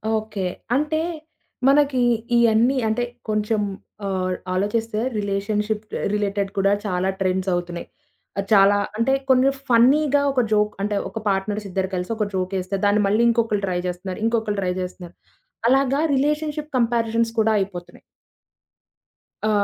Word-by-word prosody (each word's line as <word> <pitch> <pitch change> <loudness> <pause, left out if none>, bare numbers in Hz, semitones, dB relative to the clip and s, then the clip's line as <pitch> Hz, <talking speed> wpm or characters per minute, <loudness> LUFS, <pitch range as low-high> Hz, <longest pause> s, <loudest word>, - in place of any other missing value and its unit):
Okay. 215 -2 -3 0.3
అంటే 300 +3 0 0.7
మనకి 275 -2 +4 0.4
ఇయన్నీ 235 +3 +4
అంటే 220 +3 0 0.3
కొంచెం 215 0 0 0.4
ఆహ్, 185 -1 -1 0.2
ఆలోచిస్తే 215 +3 -1 0.2
రిలేషన్‌షిప్ 210 +1 -2
ఆహ్, - - -4
రిలేటెడ్ 200 -1 -1
కూడా 195 0 +3
చాలా 185 0 0
ట్రెండ్స్ 190 0 0
అవుతున్నాయి. 175 -1 -4 0.5
ఆహ్, 195 - -1
చాలా 200 -1 +6 0.2
అంటే 250 +4 +2 0.2
కొన్ని 260 +1 +5 0.2
ఫన్నీగా 280 +4 +4
ఒక 265 -2 +2
జోక్ 210 0 +2
అంటే 205 0 0
ఒక 220 - -6
పార్ట్‌నర్స్ 205 +2 -1
ఇద్దరు 190 0 -2
కలిసి 180 +4 -3
ఒక 210 -2 0
జోకేస్తే, 185 +1 -2
దాన్ని 205 +1 +3
మళ్ళీ 215 +4 +2
ఇంకొకళ్ళు 225 -3 +1
ట్రై 180 -1 -1
జేస్తున్నారు. 180 +2 -5
ఇంకొకళ్ళు 220 -3 0
ట్రై 180 -1 0
జేస్తున్నారు. 180 -1 -7 0.5
అలాగా 270 +2 +3
రిలేషన్‌షిప్ 300 +2 -1
కంపారిజన్స్ 230 -1 +1
కూడా 220 0 +3
అయిపోతున్నాయి. 180 -3 -6 1.4
ఆ! - - +2
210 Hz, 130 wpm, -22 LUFS, 195-235 Hz, 1.4 s, చాలా